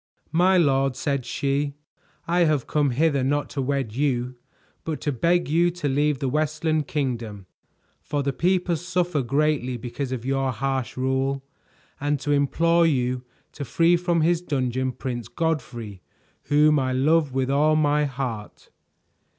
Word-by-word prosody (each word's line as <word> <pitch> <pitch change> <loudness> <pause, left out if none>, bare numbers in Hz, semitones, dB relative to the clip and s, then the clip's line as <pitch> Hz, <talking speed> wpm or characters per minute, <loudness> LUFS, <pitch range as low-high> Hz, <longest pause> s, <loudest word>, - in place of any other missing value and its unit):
"My 180 +4 +4
lord," 135 -5 +2
said 140 -3 -2
she, 140 +1 -1 0.5
"I 175 +1 +3
have 150 -5 +1
come 145 -2 +1
hither 140 +1 +1
not 145 +2 0
to 140 - -2
wed 135 -4 -2
you, 130 -3 0 0.5
but 160 -2 -3
to 145 - -1
beg 170 +7 +1
you 170 +4 +3
to 170 -3 -4
leave 145 +1 +1
the 135 - -2
Westland 155 +2 0
Kingdom, 115 -9 -3 0.6
for 145 -1 -2
the 140 0 -1
people 180 +4 +1
suffer 175 -2 -1
greatly 135 -1 0
because 125 +3 -5
of 125 -2 -4
your 135 0 0
harsh 135 +2 -2
rule; 130 +1 0 0.6
and 145 0 0
to 145 +2 -1
implore 165 +4 +3
you 125 -4 0 0.3
to 145 - -6
free 165 +7 +3
from 175 -1 +1
his 170 +1 +2
dungeon 130 -5 -1
Prince 120 -2 -5
Godfrey, 120 - -3 0.4
whom 150 0 +4
I 130 -1 -1
love 150 +3 +2
with 130 0 -1
all 150 +2 +3
my 150 -1 +2
heart." 125 -6 -6
140 Hz, 150 wpm, -24 LUFS, 130-155 Hz, 0.6 s, My